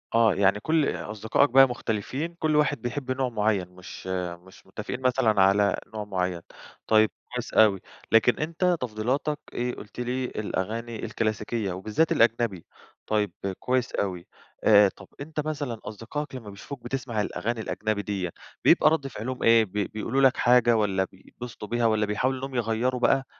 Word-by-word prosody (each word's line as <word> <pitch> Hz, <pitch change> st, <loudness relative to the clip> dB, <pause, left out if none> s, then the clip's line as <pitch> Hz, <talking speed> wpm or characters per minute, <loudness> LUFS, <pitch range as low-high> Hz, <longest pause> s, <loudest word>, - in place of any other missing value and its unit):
آه، 115 Hz, -3 st, +5 dB
يعني 100 Hz, +1 st, +3 dB
كل 155 Hz, +5 st, +1 dB
أصدقائك 110 Hz, +6 st, 0 dB
بقى 135 Hz, +2 st, +7 dB
مختلفين، 125 Hz, +8 st, -3 dB
كل 155 Hz, -1 st, +1 dB
واحد 150 Hz, -1 st, +2 dB
بيحب 130 Hz, +2 st, -3 dB
نوع 130 Hz, 0 st, 0 dB
معين، 105 Hz, -5 st, 0 dB
مش 90 Hz, +1 st, -11 dB, 0.4 s
مش 95 Hz, -, -17 dB
متفقين 105 Hz, +6 st, -6 dB
مثلًا 125 Hz, -5 st, +3 dB
على 100 Hz, +1 st, +4 dB, 0.2 s
نوع 105 Hz, -1 st, -3 dB
معين، 90 Hz, -3 st, -2 dB, 0.5 s
طيب 110 Hz, -1 st, +4 dB, 0.2 s
كويس 125 Hz, -1 st, -4 dB
أوي. 100 Hz, -4 st, +5 dB, 0.3 s
لكن 115 Hz, +2 st, +4 dB
أنت 170 Hz, +3 st, +1 dB
تفضيلاتك 125 Hz, +6 st, -1 dB
إيه، 125 Hz, 0 st, -2 dB
قلت 105 Hz, +3 st, -11 dB
لي 125 Hz, +1 st, -1 dB
الأغاني 110 Hz, +1 st, -4 dB
الكلاسيكية 110 Hz, -1 st, -2 dB
وبالذات 105 Hz, -, 0 dB
الأجنبي، 115 Hz, -6 st, +2 dB, 0.4 s
طيب 105 Hz, -3 st, +1 dB, 0.3 s
كويس 125 Hz, -1 st, 0 dB
أوي. 90 Hz, -3 st, -2 dB, 0.4 s
آآ، 105 Hz, -2 st, +7 dB
طب -, -, -14 dB
أنت 155 Hz, +2 st, -6 dB
مثلًا 145 Hz, -7 st, -3 dB
أصدقائك 130 Hz, +7 st, -6 dB
لما 115 Hz, -5 st, -8 dB
بيشوفوك 120 Hz, +6 st, -9 dB
بتسمع 120 Hz, -3 st, -2 dB
الأغاني 115 Hz, +3 st, -3 dB
الأجنبي 110 Hz, -1 st, -2 dB
ديّة، 100 Hz, -3 st, -3 dB, 0.4 s
بيبقى -, -, +6 dB
رد 155 Hz, -3 st, 0 dB
فعلهم 125 Hz, 0 st, -5 dB
إيه، 115 Hz, -1 st, +6 dB
بي 100 Hz, -1 st, -2 dB
بيقولوا 115 Hz, +5 st, -1 dB
لك 135 Hz, -1 st, +5 dB
حاجة، 120 Hz, -1 st, +4 dB
والّا 100 Hz, -3 st, +1 dB
بيتبسطوا 105 Hz, +4 st, -10 dB
بيها، 120 Hz, +2 st, 0 dB
والّا 110 Hz, -1 st, +3 dB
بيحاولوا 130 Hz, +6 st, -1 dB
إنهم 135 Hz, 0 st, -6 dB
يغيروا 120 Hz, +2 st, 0 dB
بقى 135 Hz, +1 st, +3 dB
115 Hz, 155 wpm, -26 LUFS, 105-130 Hz, 0.5 s, بقى